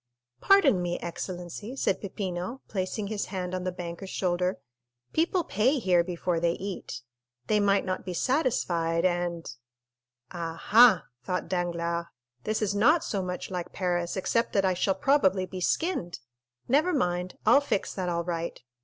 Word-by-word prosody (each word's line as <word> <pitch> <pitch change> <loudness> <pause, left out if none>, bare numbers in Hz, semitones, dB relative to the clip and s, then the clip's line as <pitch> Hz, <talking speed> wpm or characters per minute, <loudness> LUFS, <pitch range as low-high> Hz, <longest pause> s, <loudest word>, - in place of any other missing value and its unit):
"Pardon 305 - +5
me, 175 0 -1
excellency," 180 +6 -6
said 230 - 0
Peppino, 190 +3 -4
placing 195 +1 -3
his 205 0 -2
hand 185 -2 -4
on 185 0 -3
the 185 - 0
banker's 175 +1 -7
shoulder; 180 0 0 0.6
"people 340 +2 +2
pay 250 +6 +2
here 180 -7 +3
before 175 -1 -1
they 170 0 +2
eat. 185 -11 -6 0.4
They 210 - +2
might 200 -1 +3
not 185 -1 -2
be 180 - -5
satisfied, 175 - +1
and——" 175 -5 -1 0.8
"Ah, 165 -2 -4
ha," 235 +2 +6 0.2
thought 180 +6 -2
Danglars, 170 -1 -1 0.4
"this 215 0 0
is 200 -1 0
not 290 +11 +4
so 200 - -2
much 180 +1 -5
like 180 -2 -4
Paris, 175 -1 -1
except 230 +5 0
that 195 -2 +3
I 185 - +3
shall 190 +2 +1
probably 195 -5 +3
be 185 0 -7
skinned! 190 - -1 0.5
Never 305 +8 +3
mind, 180 - -1
I'll 240 +7 +6
fix 280 -8 -1
that 185 -2 -2
all 170 0 -1
right. 170 -1 -3
185 Hz, 155 wpm, -28 LUFS, 175-215 Hz, 0.8 s, ha